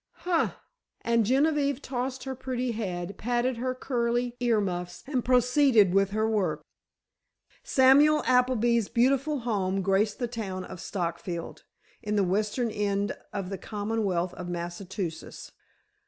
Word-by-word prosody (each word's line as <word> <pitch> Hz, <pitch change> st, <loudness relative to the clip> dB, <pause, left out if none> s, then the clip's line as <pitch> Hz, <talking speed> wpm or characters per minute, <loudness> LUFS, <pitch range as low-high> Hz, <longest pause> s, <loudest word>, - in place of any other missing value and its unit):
"Huh!" 345 Hz, -2 st, +1 dB, 0.5 s
and 230 Hz, -2 st, +2 dB
Genevieve 280 Hz, +1 st, +2 dB
tossed 260 Hz, -1 st, -4 dB
her 265 Hz, -, -4 dB
pretty 255 Hz, -1 st, -3 dB
head, 190 Hz, -4 st, -4 dB
patted 245 Hz, +2 st, 0 dB
her 255 Hz, +2 st, -2 dB
curly 240 Hz, -1 st, -1 dB
ear 240 Hz, -3 st, +2 dB
muffs, 180 Hz, -3 st, -4 dB
and 260 Hz, -3 st, -1 dB
proceeded 250 Hz, -5 st, +4 dB
with 195 Hz, 0 st, +3 dB
her 215 Hz, +2 st, 0 dB
work. 180 Hz, -9 st, 0 dB, 1.0 s
Samuel 285 Hz, +3 st, +5 dB
Appleby's 240 Hz, -3 st, +2 dB
beautiful 275 Hz, +4 st, +2 dB
home 195 Hz, -5 st, -1 dB
graced 200 Hz, +2 st, +1 dB
the 245 Hz, -, -2 dB
town 200 Hz, -6 st, -5 dB
of 185 Hz, -, -9 dB
Stockfield, 170 Hz, -2 st, -4 dB, 0.4 s
in 210 Hz, -1 st, -2 dB
the 200 Hz, -, +3 dB
western 210 Hz, +5 st, 0 dB
end 205 Hz, -1 st, -1 dB, 0.2 s
of 195 Hz, -2 st, -4 dB
the 195 Hz, -, -4 dB
Commonwealth 205 Hz, -4 st, -2 dB
of 180 Hz, -1 st, -7 dB
Massachusetts. 175 Hz, 0 st, -5 dB
225 Hz, 130 wpm, -27 LUFS, 195-250 Hz, 1.0 s, Samuel